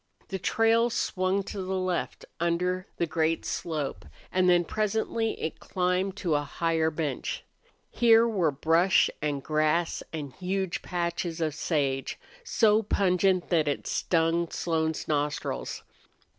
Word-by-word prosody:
The 190 - -3
trail 225 +4 +3
swung 195 -4 0
to 195 0 -5
the 190 +1 -2
left 185 -1 -2
under 180 +2 0
the 170 - +1
great 160 0 0
slope, 150 - -3 0.3
and 185 0 +3
then 175 -1 +4
presently 220 +3 -1
it 160 - -4
climbed 185 +1 -1
to 180 -6 -1
a 145 - +2
higher 160 +2 0
bench. 150 -4 -3 0.5
Here 230 -1 +5
were 190 -8 +2
brush 165 +6 +3
and 145 -2 -2
grass 155 +2 +1
and 145 -5 -5
huge 190 0 -2
patches 170 -1 -2
of 155 -2 0
sage, 140 -4 -1 0.3
so 220 - +3
pungent 185 -3 +2
that 160 -4 +2
it 145 - -1
stung 165 0 +1
Slone's 160 -2 -1
nostrils. 145 -1 -2
170 Hz, 130 wpm, -28 LUFS, 160-190 Hz, 0.5 s, Here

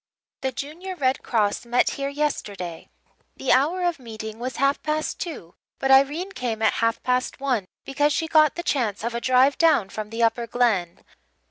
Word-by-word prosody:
"The 265 - -1
Junior 320 +9 -6
Red 265 -5 0
Cross 210 -4 0
met 240 +1 +2
here 275 0 -3
yesterday. 205 - -3 0.5
The 270 - 0
hour 315 +8 +3
of 345 -4 0
meeting 220 -2 -8
was 255 +2 -4
half 275 +1 +1
past 310 0 -2
two 285 - -6 0.2
but 270 - 0
Irene 290 +8 +4
came 230 - -3
at 220 - +4
half 230 0 0
past 250 +2 0
one, 250 -8 -1 0.2
because 290 +2 +1
she 320 +2 0
got 310 -2 +4
the 345 - -4
chance 225 - -1
of 235 +1 -2
a 235 - -3
drive 260 +3 +3
down 315 - +4
from 215 +1 -6
the 225 +1 -1
Upper 230 +1 +1
Glen. 220 -8 0
255 Hz, 180 wpm, -24 LUFS, 225-295 Hz, 0.5 s, Irene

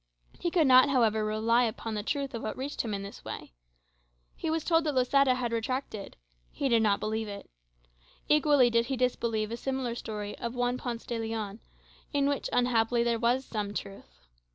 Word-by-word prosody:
He 345 - 0
could 335 -3 +3
not, 255 +1 +7
however, 225 -5 +3
rely 225 +3 +2
upon 225 0 -4
the 210 - -2
truth 275 +4 -2
of 230 - -4
what 215 - -4
reached 275 +3 -3
him 225 - -4
in 200 -1 -3
this 200 - -10
way. - - -7 0.8
He 325 - -3
was 320 -1 0
told 330 -1 +3
that 300 -3 0
Losada 260 +1 +4
had 240 -2 -2
retracted; 230 -2 -3 0.3
he 275 - -1
did 230 -2 +4
not 205 -2 +3
believe 220 +1 -2
it. 200 -1 -8 0.8
Equally 290 -4 +4
did 230 0 +2
he 270 - -2
disbelieve 230 -3 0
a 235 - -3
similar 260 -2 -2
story 210 -3 -5
of 235 0 -3
Don 250 - -7
Juan 245 0 +1
Ponce 235 -2 -5
de 235 -1 -3
Leon, 220 -2 -4 0.5
in 280 -1 +2
which, 285 -1 -1
unhappily, 235 -1 +2
there 235 -1 +1
was 245 +3 +1
some 205 -2 -4
truth. 60 - -8
235 Hz, 195 wpm, -29 LUFS, 220-260 Hz, 0.8 s, not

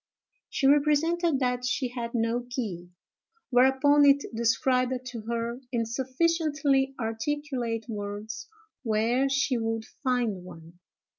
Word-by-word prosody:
She 275 - -1
represented 300 +3 +3
that 250 -1 0
she 250 +1 -1
had 240 -1 -5
no 235 +1 0
key: 195 -9 -4 0.6
whereupon, 265 +3 +5
it 280 0 +5
described 250 +2 +1
to 240 -3 -6
her, 235 +1 -2
in 235 -2 0
sufficiently 275 +2 +1
articulate 235 0 -2
words, 210 - -6 0.3
where 235 +3 +1
she 270 -2 +1
would 225 0 -2
find 240 -8 -2
one. 170 -1 -13
250 Hz, 115 wpm, -27 LUFS, 225-275 Hz, 0.6 s, whereupon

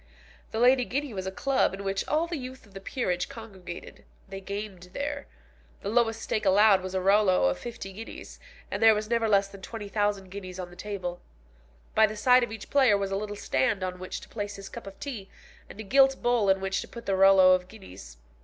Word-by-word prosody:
The - - -5
Lady 250 +1 +5
Guinea 275 +1 -3
was 190 -1 -4
a - - -2
club 265 -1 +1
in 200 - -8
which 195 0 -2
all 310 +2 +1
the 340 0 -4
youth 260 0 -9
of 205 - -21
the 195 - -8
peerage 180 -6 -2
congregated. 190 -6 -10 0.2
They 195 0 -7
gamed 200 -2 -6
there. 285 0 -4 0.6
The 200 - -2
lowest 225 0 +1
stake 215 - -1
allowed 200 0 +5
was 185 0 -6
a - - +2
rouleau 195 - +4
of 90 - -3
fifty 230 -5 -7
guineas, 225 +4 -9 0.3
and - - -3
there 225 -1 +7
was 215 +2 -4
never 230 -1 +2
less 200 -1 +4
than 195 -1 -13
20,000 205 -2 -2
guineas 185 -2 -7
on 175 -1 -6
the - - -13
table. 185 -3 -5 0.7
By 220 0 +5
the 215 0 -7
side 250 +3 +5
of 240 - -3
each 220 -2 -9
player 260 -7 +5
was 195 -1 -3
a - - 0
little 205 +1 -4
stand 185 +2 0
on 180 -1 -4
which 185 - -6
to - - -12
place 205 -2 -5
his 195 0 -9
cup - - -9
of 195 - -10
tea, 235 -9 -6 0.4
and - - -12
a - - -4
gilt 270 +5 +4
bowl 240 -4 +2
in 190 0 +3
which 195 0 -1
to - - -8
put 235 -1 -10
the 195 - +1
rouleaux 190 -1 +7
of 180 0 0
guineas. 95 - -12
200 Hz, 225 wpm, -27 LUFS, 190-225 Hz, 0.7 s, there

